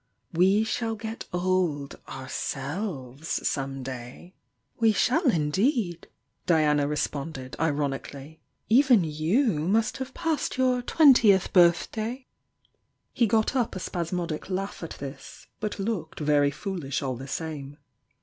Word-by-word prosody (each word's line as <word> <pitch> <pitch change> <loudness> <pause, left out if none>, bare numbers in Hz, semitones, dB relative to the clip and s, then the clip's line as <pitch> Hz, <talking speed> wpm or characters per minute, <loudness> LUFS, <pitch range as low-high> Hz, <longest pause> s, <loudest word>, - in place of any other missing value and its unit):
We 190 +5 +4
shall 225 0 -2
get 220 +1 -6
old 180 -6 0
ourselves 135 - -4
some 135 -1 -2
day!" 130 +7 -8 0.5
"We 225 -2 +4
shall 285 - +2
indeed!" 180 - 0 0.4
Diana 150 -4 +3
responded, 145 -2 -3
ironically. 145 0 -2 0.3
"Even 245 -4 +5
you 160 - +1
must 210 +8 +1
have 265 0 -6
passed 325 -5 -1
your 255 -1 +2
twentieth 240 - +5
birth 175 -2 +5
day!" 235 +4 -4 0.9
He 235 -3 +3
got 220 +4 +2
up 245 -6 0
a - - -3
spasmodic 170 -1 -3
laugh 195 +1 -3
at 165 - -7
this, 140 0 -9
but 215 0 -3
looked 195 -6 -3
very 145 -1 +3
foolish 150 -3 -4
all 130 -2 -2
the 135 +3 -8
same. 145 -2 -5
175 Hz, 120 wpm, -27 LUFS, 145-220 Hz, 0.9 s, Even